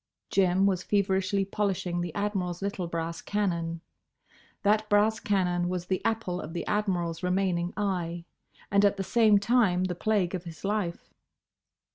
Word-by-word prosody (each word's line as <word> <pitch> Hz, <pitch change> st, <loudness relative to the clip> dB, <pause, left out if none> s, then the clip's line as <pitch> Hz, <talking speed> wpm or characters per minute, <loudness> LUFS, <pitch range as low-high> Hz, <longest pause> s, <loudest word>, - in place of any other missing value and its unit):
Jim 190 Hz, 0 st, +3 dB
was 190 Hz, -3 st, +2 dB
feverishly 195 Hz, 0 st, +1 dB
polishing 190 Hz, -3 st, -1 dB
the 175 Hz, -1 st, -3 dB
Admiral's 195 Hz, -4 st, -2 dB
little 200 Hz, -3 st, -2 dB
brass 165 Hz, 0 st, -4 dB
cannon. 170 Hz, -5 st, -1 dB, 0.8 s
That 210 Hz, +1 st, +2 dB
brass 210 Hz, +2 st, +3 dB
cannon 180 Hz, -3 st, 0 dB
was 180 Hz, -1 st, -3 dB
the 185 Hz, 0 st, -2 dB
apple 220 Hz, -6 st, -1 dB
of 155 Hz, -, -8 dB
the 170 Hz, -, -3 dB
Admiral's 180 Hz, -6 st, -1 dB
remaining 180 Hz, -1 st, 0 dB
eye; 175 Hz, -4 st, -2 dB, 0.5 s
and 200 Hz, 0 st, +4 dB
at 200 Hz, 0 st, +3 dB
the 195 Hz, -, -1 dB
same 215 Hz, +1 st, +4 dB
time 200 Hz, -4 st, +3 dB
the 185 Hz, -1 st, -1 dB
plague 195 Hz, -1 st, 0 dB
of 180 Hz, -1 st, -4 dB
his 165 Hz, +2 st, -8 dB
life. 200 Hz, -4 st, -2 dB
190 Hz, 150 wpm, -28 LUFS, 175-205 Hz, 0.8 s, and